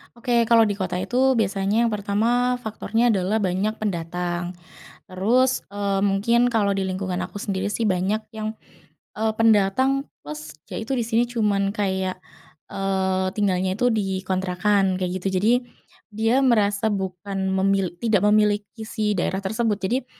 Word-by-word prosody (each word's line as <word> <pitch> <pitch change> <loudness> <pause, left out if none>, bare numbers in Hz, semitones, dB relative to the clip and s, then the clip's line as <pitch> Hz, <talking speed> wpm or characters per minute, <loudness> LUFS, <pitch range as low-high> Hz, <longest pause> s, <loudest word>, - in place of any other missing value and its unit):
Oke, 235 -1 +1
kalau 230 0 +5
di 200 - -2
kota 185 -2 -3
itu 260 +5 +2
biasanya 200 -3 0
yang - - +2
pertama 220 +5 +1
faktornya 225 +1 0
adalah 205 +1 +1
banyak 190 +3 0
pendatang. 175 -2 -3 0.5
Terus, 240 +8 +1
eee, 200 -1 -1
mungkin 230 +5 +2
kalau 205 -4 +1
di 195 - -1
lingkungan 185 -1 -2
aku 185 +2 -6
sendiri 200 -1 -2
sih 225 +2 -1
banyak 195 +3 0
yang, 215 0 -3 0.7
eee, 220 0 +1
pendatang 225 +6 +3 0.2
plus, 150 +1 -8 0.2
ya - - -4
itu 225 +5 -3
di 245 - 0
sini 230 +1 +1
cuman 205 -4 0
kayak, 190 -3 -2 0.5
eee, 190 -1 0
tinggalnya 190 -2 0
itu 245 +4 +2
di 195 -4 -1
kontrakan 190 +1 +1
kayak 185 0 -2
gitu. 190 +1 -3
Jadi, 220 +3 +4 0.6
dia 225 +4 +2
merasa 215 -6 +2
bukan 190 -1 -3
memil 190 -1 +1
tidak 215 -3 +1
memiliki 210 +1 +1
si 215 -2 -1
daerah 190 0 -1
tersebut. 220 +3 0
Jadi 235 +7 -2
205 Hz, 150 wpm, -23 LUFS, 190-225 Hz, 0.7 s, kalau